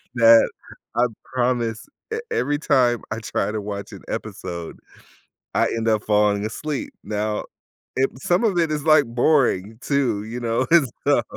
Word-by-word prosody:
that 115 -1 +6 0.4
I 120 +1 +4 0.2
promise 120 -3 -1 0.3
e - - -1
every 145 +3 0
time 125 -6 +3
I 110 - -2
try 110 - -2
to 110 - -2
watch 100 -1 -6
an - - -10
episode, 85 -1 -5 0.8
I - - +4
end 115 0 -2
up 110 -1 +1
falling 105 -1 +2
asleep. 145 +6 -4
Now, 105 0 -2 0.5
it 135 +1 +3
some 175 - +2
of 200 -5 +1
it 165 -2 +1
is, 150 -1 -2
like, 155 -2 +6
boring 115 -5 +2
too, 125 -8 0
you 115 +3 -5
know? 120 +2 0
It's 155 -8 +5
dumb, - - +3
120 Hz, 160 wpm, -22 LUFS, 110-140 Hz, 0.8 s, that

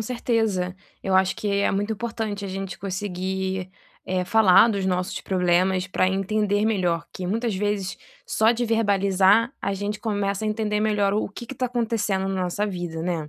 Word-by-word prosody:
certeza. 220 -6 -1 0.3
Eu 190 -1 0
acho 190 0 +3
que 210 - -3
é 200 0 +2
muito 205 +3 -1
importante 220 -2 -4
a - - -4
gente 190 -1 -5
conseguir, 190 -1 -3 0.4
eh, 185 -1 0
falar 220 +1 +6
dos 200 -4 -1
nossos 180 0 -1
problemas 185 0 +1
pra 185 0 +1
entender 205 +2 0
melhor, 180 -7 +1
que 185 - -5
muitas 225 +2 -1
vezes 205 -1 -2 0.3
só 220 +2 +3
de 240 +1 -1
verbalizar 205 0 +3
a 200 - -1
gente 205 +2 -4
começa 205 -1 -1
a - - 0
entender 210 -1 -1
melhor 205 -2 +2
o 210 - 0
que 240 +5 -9
que 270 - -7
tá 255 +1 -1
acontecendo 220 -5 -1
na 190 -1 -1
nossa 205 +4 -1
vida, 175 -4 -4
né. 165 -4 -2
200 Hz, 175 wpm, -24 LUFS, 185-215 Hz, 0.4 s, falar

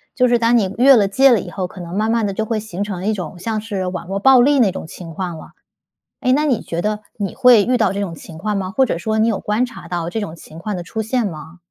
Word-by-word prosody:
就 250 - +3
是 240 -1 +3
当 230 +1 +3
你 195 -3 0
越 270 +2 +7
了 205 -4 +3
界 265 +7 +5
了 235 - +4
以 - - -7
后， 185 -2 -3
可 185 - -13
能 175 0 -7
慢 215 +2 0
慢 230 -2 +1
地 200 - -2
就 220 - -2
会 220 0 -2
形 205 -2 -5
成 190 -3 -5
一 215 - +1
种 180 -4 -6
像 215 +3 -3
是 200 -4 -4
网 180 -1 -5
络 195 +1 -3
暴 255 +5 +6
力 280 +2 +4
那 205 -6 +4
种 160 - -7
情 165 0 -10
况 175 -1 -4
了。 - - -12 0.7
哎， 255 - +1
那 300 +2 +2
你 260 -7 +1
觉 170 +2 -4
得 210 0 -1 0.2
你 200 -3 -3
会 250 -5 +6
遇 250 +4 +1
到 225 - +2
这 200 - -3
种 195 -4 -3
情 160 0 -11
况 210 +4 -2
吗？ 190 -2 -2
或 260 +7 +2
者 170 - -2
说 220 +4 -1
你 220 +1 +3
有 220 -4 0
观 215 +4 0
察 245 -9 -11
到 175 -1 -3
这 220 - -2
种 165 -5 -5
情 160 0 -13
况 210 +3 -4
的 175 - -5
出 220 +5 -4
现 230 +2 -1
吗？ 160 -2 -7
210 Hz, 320 characters per minute, -19 LUFS, 180-230 Hz, 0.7 s, 越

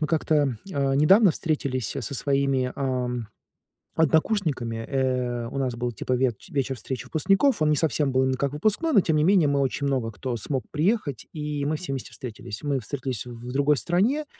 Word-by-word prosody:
мы 155 - +1
как-то, 150 -5 +1 0.2
а, 140 -2 +1
недавно 185 +7 +6
встретились, 140 -8 -2
а, - - -3
со 120 - -4
своими, 135 -1 +1
ам, 125 -3 -2 0.7
однокурсниками. 160 - +1
Э, 125 -3 -1
у - - -7
нас 130 -2 0
был 120 +1 -2
типа 120 +3 -4
ветч 125 -3 -1
вечер 135 -1 -1
встречи 125 +2 -5
выпускников. 195 - +2
Он 155 - +3
не 150 - +3
совсем 145 -2 +1
был 130 0 +2
как 140 +1 -1
выпускной, 215 - +1
но 210 - +6
тем 160 -3 +1
не 150 - +3
менее 180 -4 +4
мы 140 0 +1
очень 140 +1 -1
много 130 -5 0
кто 120 +3 -4
смог 130 +4 -2
приехать, 155 - 0
и 150 -2 -3
мы 155 +2 0
все 165 -3 -5
вместе 135 -2 -5
встретились. 110 -3 -8
Мы 145 -2 0
встретились 130 -1 -4
в 120 0 -9
другой 140 +1 +3
стране, 225 - +1
140 Hz, 190 wpm, -25 LUFS, 125-155 Hz, 0.7 s, недавно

